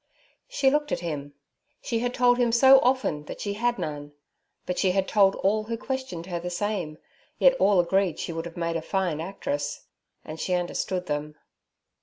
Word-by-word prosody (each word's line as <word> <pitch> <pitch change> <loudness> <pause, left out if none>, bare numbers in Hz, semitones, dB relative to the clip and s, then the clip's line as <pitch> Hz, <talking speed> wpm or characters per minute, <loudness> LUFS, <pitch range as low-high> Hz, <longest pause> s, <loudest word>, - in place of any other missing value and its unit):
She 290 - +2
looked 295 +1 0
at - - -1
him. 145 -4 -5 0.4
She 230 - -2
had 245 +1 -1
told 245 -1 +3
him 240 -1 +3
so 265 +3 +7
often 250 - 0
that - - -8
she 205 - -3
had 240 +3 0
none; 145 -1 -5 0.5
but 180 - -2
she 185 -2 +2
had 195 0 +1
told 195 -2 +4
all 215 +2 0
who 230 +1 -3
questioned 260 -10 -5
her 175 -2 -4
the 180 +1 -5
same, 180 -4 -3 0.4
yet - - +5
all 200 -3 +4
agreed 185 0 +1
she 170 - -4
would 165 +1 -4
have 170 0 -9
made 170 -1 -2
a 165 - -1
fine 175 -3 -1
actress. 200 - -4 0.4
And 155 +1 -8
she 180 - 0
understood 180 +1 -2
them. 150 -1 -3
190 Hz, 190 wpm, -26 LUFS, 165-240 Hz, 0.5 s, so